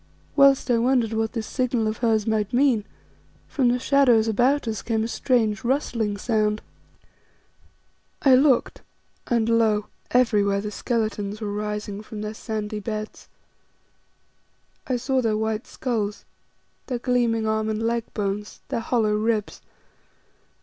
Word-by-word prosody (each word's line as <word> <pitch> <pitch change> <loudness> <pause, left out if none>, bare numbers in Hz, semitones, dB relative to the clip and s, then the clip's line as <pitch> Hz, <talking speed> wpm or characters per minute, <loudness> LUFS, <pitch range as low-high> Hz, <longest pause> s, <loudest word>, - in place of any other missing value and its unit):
Whilst 275 -2 +5
I 235 - +3
wondered 240 -2 +2
what 220 0 -1
this 225 -3 -3
signal 250 -3 -1
of 215 0 -2
hers 225 -3 +1
might 215 -1 0
mean, 245 -5 +3 0.6
from 265 -4 +1
the 245 +1 +3
shadows 250 -4 +3
about 245 +5 +2
us 220 -2 -2
came 220 -2 -1
a - - -1
strange, 230 -2 0
rustling 235 -5 -1
sound. 215 -1 0 1.6
I 270 - +6
looked, 265 -1 +3 0.5
and 230 -2 +1
lo! 220 -2 +2 0.2
everywhere 210 -5 +2
the 210 +1 -4
skeletons 215 -3 -2
were 210 -2 -4
rising 210 -1 -4
from 215 -1 -8
their 210 0 -4
sandy 215 -1 -4
beds. 215 0 -6 1.6
I 255 - 0
saw 260 +1 0
their 220 -3 +1
white 220 +1 -2
skulls, 215 -5 -3 0.6
their 250 - -2
gleaming 235 -2 +1
arm 220 0 0
and 215 +1 -2
leg 230 0 -1
bones, 205 0 -3
their - - -1
hollow 225 -2 +1
ribs. 215 0 -1
225 Hz, 135 wpm, -24 LUFS, 215-245 Hz, 1.6 s, I